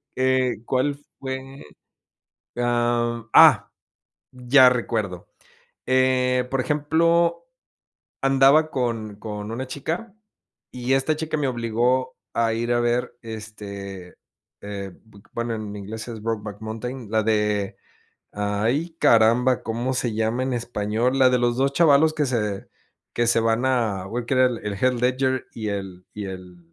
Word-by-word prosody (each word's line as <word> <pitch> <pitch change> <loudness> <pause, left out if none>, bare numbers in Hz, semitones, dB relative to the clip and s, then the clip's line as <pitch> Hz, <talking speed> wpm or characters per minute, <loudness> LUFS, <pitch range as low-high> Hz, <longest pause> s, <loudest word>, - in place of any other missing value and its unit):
eh, 130 -1 +1
¿cuál 135 +2 0 0.2
fue?, 135 0 -6 0.9
ah, 120 -1 0
mm, - - -33
ah, - - +7 0.6
ya 125 +1 +5
recuerdo, 110 -7 -2 0.6
eh, 130 -1 +2
por 135 -1 0
ejemplo, 165 - +1 0.7
andaba 135 +3 +4
con 115 -5 -2
con 105 0 -6
una 125 +3 -4
chica 170 - -5 0.6
y 125 +1 -2
esta 145 +3 +1
chica 155 0 -3
me 145 -3 0
obligó 125 +2 0 0.2
a 115 -1 +1
ir 120 +1 -1
a 120 - +2
ver, 120 +1 0
este, 100 -4 -8 0.5
eh, 100 -2 -6
bu 100 -2 -18
bueno, 115 -1 -2
en 105 -1 -6
inglés 110 +3 -7
es 110 -2 -7
Brokeback 105 -2 -4
Mountain, 115 +1 -6
la 110 -1 +2
de, 105 -2 0 0.6
ay, 110 +11 -1
caramba, 120 +3 +4
¿cómo 120 +3 -2
se 120 -3 -1
llama 110 +3 0
en 130 - -2
español? 115 +2 -1
La 130 -1 +6
de 125 - +2
los 120 0 +1
2 135 +1 +1
chavalos, 155 0 +4
que 150 -2 0
se 105 -5 -2 0.5
que 120 0 +1
se 115 - +3
van 115 +3 +1
a 110 -7 0
u 120 +2 -3
que 135 - 0
era 130 0 +5
el 120 -2 -2
el 100 - -2
Head 130 +5 +1
Ledger 130 +1 0
y 110 -2 -4
el 95 -2 -6
y 105 -1 -5
el 90 -2 -9
120 Hz, 145 wpm, -23 LUFS, 110-130 Hz, 0.9 s, ah